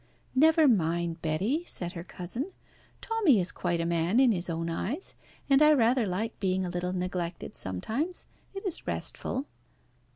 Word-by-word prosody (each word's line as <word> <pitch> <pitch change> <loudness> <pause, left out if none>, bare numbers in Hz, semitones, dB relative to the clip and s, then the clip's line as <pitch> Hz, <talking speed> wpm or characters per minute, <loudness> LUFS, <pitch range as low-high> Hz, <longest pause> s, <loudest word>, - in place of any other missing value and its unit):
"Never 315 +3 +5
mind, 170 -6 +1
Betty," 195 - 0
said 175 -1 -3
her 170 -2 -7
cousin. 230 - -4 0.5
"Tommy 410 - +3
is 180 0 0
quite 175 -1 -1
a 165 - 0
man 170 +6 +2
in 260 -3 +6
his 180 -3 -1
own 165 0 -2
eyes, 225 - -2 0.3
and 275 0 +5
I 305 0 +7
rather 240 -3 +3
like 210 +5 -3
being 190 -1 0
a - - -3
little 180 0 -2
neglected 180 -1 -3
sometimes. 225 - -3 0.3
It 390 - -6
is 370 - -3
restful." 265 +3 -2
190 Hz, 160 wpm, -29 LUFS, 170-270 Hz, 0.5 s, I